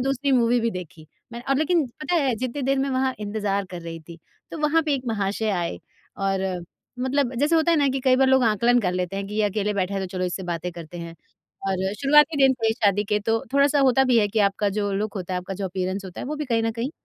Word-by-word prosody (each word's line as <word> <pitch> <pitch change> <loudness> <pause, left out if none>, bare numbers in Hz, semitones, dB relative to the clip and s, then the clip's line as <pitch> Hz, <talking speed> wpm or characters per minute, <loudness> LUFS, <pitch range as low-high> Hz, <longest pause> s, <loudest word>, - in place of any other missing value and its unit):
दूसरी 270 +1 0
मूवी 240 -1 +3
भी 230 0 0
देखी। 165 -4 -9 0.3
मैंने 235 +1 -8
अब 270 - +2
लेकिन 315 -2 +2
पता 305 +4 -1
है 275 -7 +2
जितनी 255 +4 -3
देर 270 +1 +1
मैं 275 0 0
वहाँ 260 0 0
इंतज़ार 205 -1 -1
कर 175 -1 -6
रही 165 0 -7
थी 170 -1 -10 0.3
तो 325 - -6
वहाँ 300 +2 +2
पे 305 -2 0
एक 265 - -3
महाशय 210 0 -1
आए 175 -4 -2 0.4
और 190 -2 -1 0.3
मतलब 260 0 0
जैसे 290 +7 +2
होता 320 +1 +3
है 330 - +4
ना 285 - +3
कि 265 0 -1
कई 255 -1 +5
बार 265 0 +4
लोग 265 -1 +4
आकलन 235 +3 +3
कर 180 -3 0
लेते 180 +1 -2
हैं 195 0 -3
कि 210 - -7
ये 215 - +1
अकेले 210 +1 -1
बैठा 195 0 -1
है 195 - -1
तो 190 - -3
चलो 185 - 0
इससे 180 +1 -3
बातें 175 0 -3
करते 170 0 -9
हैं। 170 0 -7 0.5
और 190 +1 -1
शुरुआती 295 +5 +4
दिन 265 - +3
थे 220 0 +3
शादी 205 -3 +1
के 210 +1 +1
तो 225 +2 0
थोड़ा-सा 280 +1 +4
होता 265 0 +4
भी 245 -3 +4
है 205 -1 +2
कि 220 - -2
आपका 200 +1 +2
जो 205 0 -1
लुक 210 +2 -2
होता 185 -1 -5
है, - - 0
आपका 180 +2 -6
जो 195 - -4
अपीयरेंस 185 +1 -3
होता 180 - -8
है - - -5
वो 300 +1 -3
भी 300 - -3
कहीं 230 -4 0
न 225 - 0
कहीं 235 +5 -3
220 Hz, 265 wpm, -24 LUFS, 195-265 Hz, 0.5 s, कई